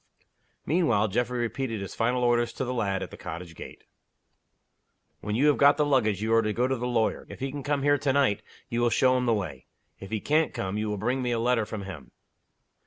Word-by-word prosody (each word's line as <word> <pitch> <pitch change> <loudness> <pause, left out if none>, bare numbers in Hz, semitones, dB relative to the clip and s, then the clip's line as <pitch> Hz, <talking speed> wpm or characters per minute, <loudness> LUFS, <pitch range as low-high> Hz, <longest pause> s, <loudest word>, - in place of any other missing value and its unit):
Meanwhile 120 - +2
Geoffrey 125 +4 -1
repeated 120 0 -2
his 100 -1 -6
final 125 +2 0
orders 120 -1 +2
to 130 - -3
the 125 - -2
lad, 100 -5 -1
at - - -8
the - - -10
cottage 85 +1 -7
gate. - - -11 1.4
"When 105 +1 -3
you 135 +6 +3
have 150 -1 +4
got 145 0 +6
the 150 - +2
luggage, 110 -8 +1
you 110 +1 +1
are 115 - +5
to 110 -1 -1
go 120 +3 +1
to 135 - 0
the 125 0 -3
lawyer. 115 -3 0
If - - -9
he 135 +1 -3
can 145 +1 -5
come 145 -1 -1
here 145 0 +3
to 140 -1 +1
night, 135 -7 +2 0.3
you 120 0 -1
will 120 - +3
show 130 +2 +3
him 125 -1 0
the 115 - +4
way. 95 -8 -5 0.3
If 95 - -9
he 110 0 -2
can't 155 +7 +1
come, 95 +1 -3
you 105 0 -1
will 105 - -2
bring 125 +6 -1
me 125 - -1
a 120 -1 0
letter 115 -2 +1
from 105 -2 -5
him. 85 -8 -9
120 Hz, 240 wpm, -27 LUFS, 105-130 Hz, 1.4 s, got